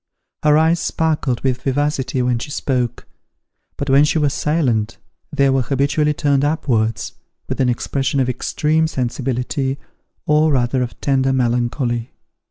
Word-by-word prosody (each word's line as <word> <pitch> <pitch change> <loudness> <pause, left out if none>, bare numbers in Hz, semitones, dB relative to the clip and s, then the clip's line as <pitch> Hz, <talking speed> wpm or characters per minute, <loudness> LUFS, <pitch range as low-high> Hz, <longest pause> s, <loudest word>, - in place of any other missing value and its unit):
Her 150 0 +4
eyes 160 +2 +3
sparkled 150 -8 -1
with 130 -1 -1
vivacity 135 -2 -1
when 125 -1 +1
she 140 - -6
spoke; 125 -4 -2 0.7
but 140 - -3
when 135 +1 +5
she 150 - +1
was 145 -3 +1
silent 120 -8 0 0.3
they 140 - +2
were 135 0 +2
habitually 140 +4 +1
turned 140 -2 +1
upwards, 115 -9 0 0.3
with - - -2
an 130 - +3
expression 135 +3 -1
of 130 - +2
extreme 155 +5 0
sensibility, 130 0 -2 0.5
or 150 0 +3
rather 125 0 +1
of 120 -1 -4
tender 135 -1 +2
melancholy. 120 -1 -1
135 Hz, 140 wpm, -19 LUFS, 125-150 Hz, 0.7 s, when